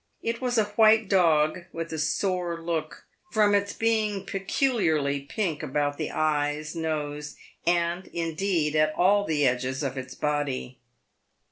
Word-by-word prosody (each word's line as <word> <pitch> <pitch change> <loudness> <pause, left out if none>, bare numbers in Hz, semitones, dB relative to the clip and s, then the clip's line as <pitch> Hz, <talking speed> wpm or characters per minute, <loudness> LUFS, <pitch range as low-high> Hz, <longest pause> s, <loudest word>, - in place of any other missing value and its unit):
It 230 +1 -2
was 245 -1 0
a 220 - +5
white 215 +1 +4
dog, 170 -3 +3
with 165 0 -5
a 160 - -3
sore 175 +1 -1
look, 165 -2 -4 0.2
from 210 -2 +3
its 200 0 +2
being 215 -3 0
pecu 195 +8 0
liarly 145 - 0
pink 180 -9 -2
about 145 0 -1
the 155 - -2
eyes, 150 0 -1
nose, 150 -2 -3 0.3
and, 175 +1 +1
indeed, 165 -2 -1
at 155 0 +2
all 200 +3 +3
the 150 -4 +1
edges 130 +2 0
of 135 -1 -2
its 130 0 -8
body. 145 -4 -2
165 Hz, 145 wpm, -26 LUFS, 150-195 Hz, 0.3 s, a